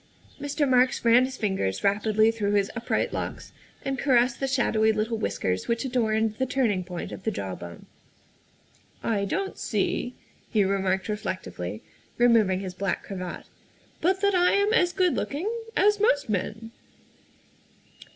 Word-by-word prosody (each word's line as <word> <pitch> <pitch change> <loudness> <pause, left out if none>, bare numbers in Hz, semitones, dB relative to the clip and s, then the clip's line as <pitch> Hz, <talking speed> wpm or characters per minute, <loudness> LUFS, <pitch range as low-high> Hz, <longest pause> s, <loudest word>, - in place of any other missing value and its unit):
' - - -29
' - - -20
Mr. 290 +1 0
Marks 255 -1 +3
ran 240 +2 +6
his 260 0 -6
fingers 190 - -1
rapidly 215 +2 +3
through 210 -3 -1
his 200 -1 +2
upright 230 0 -1
locks - - -5 0.3
and 270 -1 -2
caressed 245 -3 +3
the 270 - 0
shadowy 225 -4 +2
little 220 +1 -1
whiskers 95 -2 -2
which 235 +3 0
adorned 220 -4 +1
the 260 - +2
turning 230 -8 +1
point 180 -1 -6
of - - -7
the 220 - -1
jaw 95 - -4
bone. 85 -1 -9 0.6
" - - -34
I 200 -1 0
don't 390 - -3
see," 245 0 -1 0.3
he 215 -4 +3
remarked 190 -1 0
reflectively, 185 - -4 0.3
removing 220 -6 +4
his 185 -2 -5
black 195 +2 -2
cravat, 185 -3 -6 0.3
" - - -33
but 375 +3 +2
that 400 0 +3
I 360 -1 +4
am 405 +2 +2
as 355 -6 +3
good 365 -2 +2
looking 300 +8 -2 0.3
as 415 +2 +4
most 290 - +2
men. 215 +3 -3
225 Hz, 160 wpm, -26 LUFS, 195-270 Hz, 0.6 s, ran